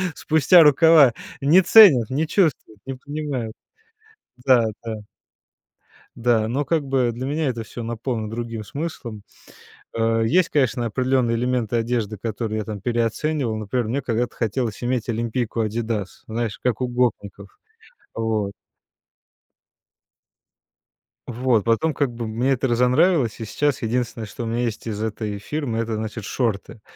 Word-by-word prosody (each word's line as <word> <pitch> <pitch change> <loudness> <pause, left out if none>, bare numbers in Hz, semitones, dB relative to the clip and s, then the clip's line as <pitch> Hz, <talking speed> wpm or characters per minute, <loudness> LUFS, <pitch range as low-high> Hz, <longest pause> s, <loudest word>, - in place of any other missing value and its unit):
спустя 160 +3 +5
рукава. 150 -3 +6 0.3
Не 160 +7 +6
ценят, 175 - +7
не 145 +5 0
чувствуют, 155 - 0
не 135 - -4
понимают. 140 -4 -5 0.9
Да, 125 -4 +5 0.2
да. 110 -2 -5 1.2
Да, 115 -2 +1
но 135 +6 -1
как 160 +2 0
бы 130 -3 +1
для 125 +3 -5
меня 150 +2 -1
это 115 -2 -4
всё 115 +1 -8
наполнено 115 -1 -3
другим 115 -1 -5
смыслом. 120 -5 -6 0.7
Э, 115 0 +1
есть, 175 +9 +3
конечно, 130 -4 +1
определённые 125 0 +1
элементы 120 -1 -1
одежды, 115 -2 -1
которые 110 +1 -3
я - - -2
там 105 -3 -6
переоценивал. 120 +2 -1
Например, 110 +2 -2
мне 135 +5 -1
когда-то 120 -1 -2
хотелось 115 -1 -2
иметь 125 -1 -1
олимпийку 115 +1 -2
"Адидас", 110 -2 -3
знаешь, 115 -1 -3
как 125 0 0
у 125 - 0
гопников, 105 -5 -3 0.6
вот. 110 -3 -1 2.8
Вот, 120 -2 +1
потом 115 +9 +1
как 140 -4 0
бы 115 -1 -5
мне 120 +5 0
это 135 +1 -1
разонравилось, 125 - +2
и 115 - -5
сейчас 145 +6 -1
единственное, 115 -1 -2
что 105 +3 -7
у - - -4
меня 115 +2 -1
есть 115 -1 -4
из 105 -2 -4
этой 110 -1 -4
фирмы- 125 +2 -4
это, 115 -1 -2
значит, 110 0 -5
шорты. 110 0 -3
120 Hz, 140 wpm, -22 LUFS, 110-130 Hz, 2.8 s, ценят